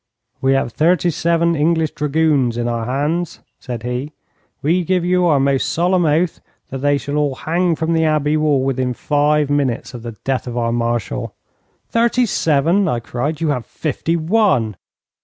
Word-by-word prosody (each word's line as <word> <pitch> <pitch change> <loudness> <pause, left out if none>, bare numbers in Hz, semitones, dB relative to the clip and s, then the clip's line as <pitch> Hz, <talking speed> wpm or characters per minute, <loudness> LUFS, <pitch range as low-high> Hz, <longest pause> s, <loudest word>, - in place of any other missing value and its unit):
'We 135 0 +3
have 135 -4 0
thirty 175 +2 +2
seven 170 +1 +1
English 160 +1 +1
dragoons 150 -5 +1
in 120 0 -1
our 115 -1 -2
hands,' 150 +7 -2 0.2
said 120 -4 -6
he. 125 +5 -4 0.5
'We 170 +5 +2
give 180 0 0
you 180 0 +2
our 150 -4 +3
most 135 0 +1
solemn 175 +1 +1
oath 160 +3 +1 0.3
that 135 - -5
they 145 +1 +2
shall 145 +1 -4
all 145 -3 0
hang 170 +3 0
from 160 +1 -1
the 160 0 +2
Abbey 155 -1 +1
wall 150 -3 +2
within 130 -2 -1
five 150 +1 +1
minutes 135 -4 -1
of 120 - -7
the 115 0 -7
death 130 -1 -1
of 120 0 -5
our 115 -1 0
Marshal.' 120 -1 -2 0.5
'Thirty 235 +2 +2
seven!' 170 +1 +2
I 120 -7 0
cried. 145 +7 -3
'You 160 - +1
have 125 -5 -1
fifty 160 +2 -2
one.' 160 - +1
150 Hz, 175 wpm, -18 LUFS, 130-165 Hz, 0.5 s, We